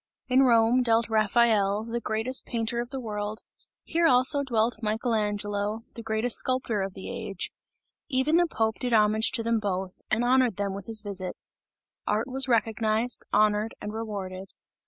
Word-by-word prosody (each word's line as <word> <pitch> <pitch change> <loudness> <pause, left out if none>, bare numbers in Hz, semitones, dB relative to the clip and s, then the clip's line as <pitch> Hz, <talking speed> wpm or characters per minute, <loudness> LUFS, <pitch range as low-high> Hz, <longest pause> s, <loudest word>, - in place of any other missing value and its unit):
In 255 +1 +4
Rome 235 -1 +4
dwelt 230 -1 +2
Raphael, 215 -2 +2
the 230 +1 -3
greatest 225 +3 -1
painter 235 0 -2
of 240 0 -3
the 270 0 -5
world, 210 -2 -4 0.4
here 335 0 +2
also 260 +2 +4
dwelt 230 -4 0
Michael 225 +2 -1
Angelo, 205 0 -1
the 230 - -8
greatest 225 +1 +1
sculptor 255 -5 +1
of 195 0 -4
the 190 - -8
age; 195 -2 -5 0.6
even 280 +4 +2
the 345 0 +3
Pope 220 -7 -1
did 250 -2 -2
homage 215 0 +3
to 230 - -1
them 230 0 +1
both, 190 -2 -4
and 225 +3 +1
honoured 255 -3 +3
them 200 0 -2
with 195 -1 -8
his 220 -1 +2
visits. 190 -3 -5 0.5
Art 215 +3 0
was 265 +1 +1
recognized, 225 0 +1
honoured 210 +1 +2
and 210 - -6
rewarded. 195 -4 -6
225 Hz, 165 wpm, -27 LUFS, 210-245 Hz, 0.6 s, In